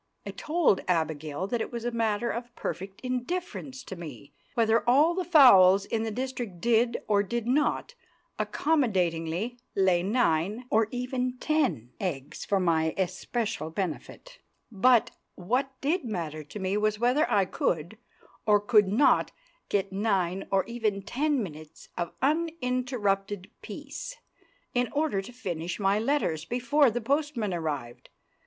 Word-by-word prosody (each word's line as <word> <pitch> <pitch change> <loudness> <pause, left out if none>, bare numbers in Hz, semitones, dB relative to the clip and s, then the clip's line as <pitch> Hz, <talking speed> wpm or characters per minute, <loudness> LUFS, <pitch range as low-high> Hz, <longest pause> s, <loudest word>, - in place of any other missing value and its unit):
I - - -4
told 315 - +1
Abigail 160 -1 -1
that 230 +3 -2
it - - -4
was 235 -1 -5
a 240 - 0
matter 230 0 0
of 240 +1 -6
perfect 190 +1 -5
indifference 260 +1 -4
to 190 - -7
me 160 -4 -10 0.2
whether 225 -2 +3
all 295 +7 +5
the 370 +1 -1
fowls 200 - +7
in 220 - -1
the 225 - -2
district 245 -5 -4
did, 235 +3 +2
or 205 -1 +3
did 235 +3 -3
not, 295 - +1 0.5
accommodatingly 195 - 0 0.2
lay 185 -3 +3
nine, 205 +1 +1
or 220 0 +3
even 250 +1 -2
ten, 265 - 0
eggs 145 -7 -4
for 200 - +1
my 160 -3 +1
especial 190 -1 -2
benefit; 195 - -5 0.3
but 235 +3 +4 0.2
what 250 +9 0
did 320 +5 0
matter 165 - -4
to 150 - -9
me 190 0 -1
was 215 0 +1
whether 250 +7 +2
I 200 -2 +3
could, 175 +2 -2 0.5
or 210 -1 +6
could 210 -1 +4
not, 225 +9 +3 0.4
get 195 -1 0
nine 195 -3 0
or 195 -1 +2
even 220 -4 -2
ten 280 +4 0
minutes 155 -4 -10
of 170 -1 -3
uninterrupted 250 - -1
peace, - - -7 0.6
in 245 -2 +1
order 295 -9 +1
to 195 - -10
finish 180 -9 -4
my 200 +1 +2
letters 220 - 0
before 250 - +3
the 240 +2 -3
postman 275 -5 -1
arrived. 145 -8 -4
215 Hz, 140 wpm, -28 LUFS, 185-250 Hz, 0.6 s, fowls